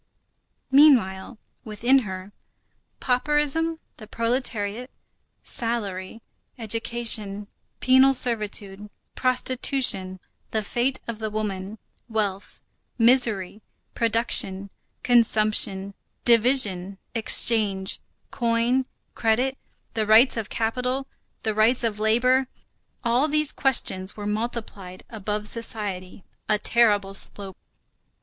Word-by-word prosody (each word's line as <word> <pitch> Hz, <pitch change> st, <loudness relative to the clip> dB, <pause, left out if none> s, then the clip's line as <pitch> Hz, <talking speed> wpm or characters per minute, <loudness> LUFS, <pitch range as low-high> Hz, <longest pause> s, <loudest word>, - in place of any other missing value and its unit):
Meanwhile, 245 Hz, -7 st, +3 dB, 0.3 s
within 235 Hz, +5 st, +2 dB
her, 190 Hz, -4 st, -7 dB, 0.7 s
pauperism, 295 Hz, +5 st, 0 dB, 0.2 s
the 215 Hz, -, -12 dB
proletariat, 230 Hz, 0 st, -3 dB, 0.5 s
salary, 220 Hz, -3 st, -4 dB, 0.3 s
education, 225 Hz, -2 st, -2 dB, 0.4 s
penal 260 Hz, +1 st, +5 dB
servitude, 210 Hz, -4 st, -1 dB, 0.2 s
prostitution, 255 Hz, -7 st, +1 dB, 0.3 s
the 220 Hz, -1 st, -2 dB
fate 245 Hz, +5 st, -1 dB
of 230 Hz, -2 st, -6 dB
the 220 Hz, -1 st, -3 dB
woman, 210 Hz, -1 st, -5 dB, 0.3 s
wealth, 205 Hz, -3 st, -4 dB, 0.4 s
misery, 225 Hz, -5 st, +2 dB, 0.3 s
production, 215 Hz, -4 st, +1 dB, 0.3 s
consumption, 215 Hz, -4 st, +2 dB, 0.3 s
division, 220 Hz, -6 st, +2 dB, 0.2 s
exchange, 215 Hz, -4 st, +3 dB, 0.3 s
coin, 240 Hz, +1 st, 0 dB, 0.3 s
credit, 245 Hz, +4 st, 0 dB, 0.4 s
the 215 Hz, -2 st, -2 dB
rights 225 Hz, +5 st, +5 dB
of 225 Hz, -3 st, -5 dB
capital, 250 Hz, +4 st, -2 dB, 0.4 s
the 220 Hz, -, -1 dB
rights 225 Hz, +4 st, +2 dB
of 215 Hz, -2 st, -2 dB
labor,—all 250 Hz, +2 st, -1 dB
these 305 Hz, -1 st, +1 dB
questions 205 Hz, -8 st, +1 dB
were 205 Hz, -, -6 dB
multiplied 210 Hz, -4 st, -5 dB
above 210 Hz, -1 st, -4 dB
society, 205 Hz, -5 st, -5 dB, 0.3 s
a 215 Hz, -, +3 dB
terrible 205 Hz, -3 st, +2 dB
slope. 195 Hz, -1 st, -2 dB
225 Hz, 85 wpm, -24 LUFS, 205-245 Hz, 0.7 s, penal